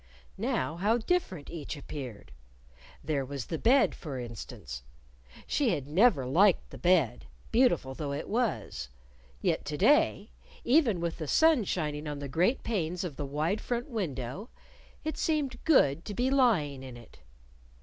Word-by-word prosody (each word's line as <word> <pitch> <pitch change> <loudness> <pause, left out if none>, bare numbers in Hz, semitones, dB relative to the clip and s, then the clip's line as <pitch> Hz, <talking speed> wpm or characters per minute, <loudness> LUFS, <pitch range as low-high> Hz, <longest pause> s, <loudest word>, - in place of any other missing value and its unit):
Now 140 +6 -1
how 210 +6 +2
different 225 - -1
each 155 -2 -6
appeared! 130 - -8 0.7
There 145 -2 -1
was 135 -2 -5
the 160 - -4
bed, 255 +3 +4
for 145 -5 -6
instance. 110 - -7 0.6
She 275 -6 +1
had 140 - -5
never 175 - +4
liked 180 +9 +3
the - - -10
bed, 175 -9 +2 0.2
beautiful 235 - +3
though 145 +1 -4
it 140 - -4
was. 220 - -2 0.5
Yet - - +1
to - - -3
day, - - +3 0.3
even 240 - +3
with 170 0 -3
the 155 - -4
sun 315 - +4
shining 150 -4 -2
on 145 -1 -4
the 140 0 -5
great 175 - +1
panes 180 -6 -2
of 170 -6 -5
the 145 - -4
wide 155 +9 -1
front 245 +4 -3
window, 170 - -4 0.5
it 310 0 -3
seemed 285 -6 -1
good 165 - +4
to 205 - -5
be 255 +4 +1
lying 190 - +2
in 130 -2 -9
it. 120 - -16
165 Hz, 155 wpm, -29 LUFS, 140-235 Hz, 0.7 s, bed